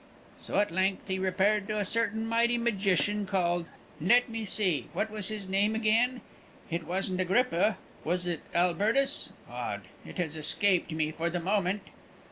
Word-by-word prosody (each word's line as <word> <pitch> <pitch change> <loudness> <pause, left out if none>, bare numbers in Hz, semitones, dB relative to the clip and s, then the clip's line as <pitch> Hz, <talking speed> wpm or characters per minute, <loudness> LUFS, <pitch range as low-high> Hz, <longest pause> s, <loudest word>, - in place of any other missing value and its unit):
So - - -3
at 205 -2 +2
length 190 +3 0
he 190 -1 -1
repaired 195 +2 +2
to 215 - -2
a 205 - 0
certain 225 +1 0
mighty 235 +1 +2
magician 205 -3 +1
called 175 -3 0 0.3
Let 240 +9 +4
me 225 -1 -4
see, 185 - 0
what 220 - -1
was 210 -3 -1
his 210 -3 -4
name 200 +3 +2
again? 230 +3 +2 0.5
It 165 -1 -3
wasn't 185 +1 -1
Agrippa 195 0 +2 0.3
was 180 +2 -1
it 175 -3 -2
Albertus? 205 +10 +1 0.2
Odd; - - -4 0.2
it - - -10
has 160 -4 -2
escaped 175 +4 +2
me 155 -1 0
for 165 +2 -2
the 175 +1 -2
moment." 195 +2 0
195 Hz, 160 wpm, -29 LUFS, 175-215 Hz, 0.5 s, Let